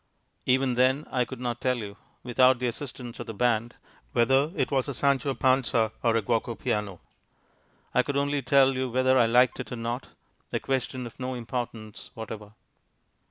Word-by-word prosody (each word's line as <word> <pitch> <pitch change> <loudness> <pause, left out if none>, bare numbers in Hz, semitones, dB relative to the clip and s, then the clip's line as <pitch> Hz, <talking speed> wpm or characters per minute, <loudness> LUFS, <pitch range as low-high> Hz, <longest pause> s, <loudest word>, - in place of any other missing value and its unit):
Even 130 0 +3
then 130 +4 +2
I 125 -1 +1
could 130 -1 -8
not 120 -1 -3
tell 125 -1 +1
you 105 -3 -6 0.3
(without 130 +1 +4
the 125 - -3
assistance 120 -1 -5
of - - -6
the 115 - -6
band) 120 0 +1 0.4
whether 135 +6 +3
it - - 0
was 135 -1 +1
a 140 - -3
Sancho 140 0 +2
Panza 125 -4 +2
or 115 -2 +2
a 115 - +1
Guoco 115 +1 0
Piano. 105 -6 -2 0.9
I - - +5
could 140 +2 -2
only 145 0 +1
tell 135 +1 +4
you 130 0 -2
whether 130 +1 +3
I 115 - +5
liked 125 +2 +4
it - - -6
or - - -3
not, 120 +2 -4 0.4
a - - 0
question 130 -1 -2
of 120 - -11
no 130 0 -3
importance 115 -3 -6
whatever. 110 -1 -8
125 Hz, 180 wpm, -27 LUFS, 115-130 Hz, 0.9 s, I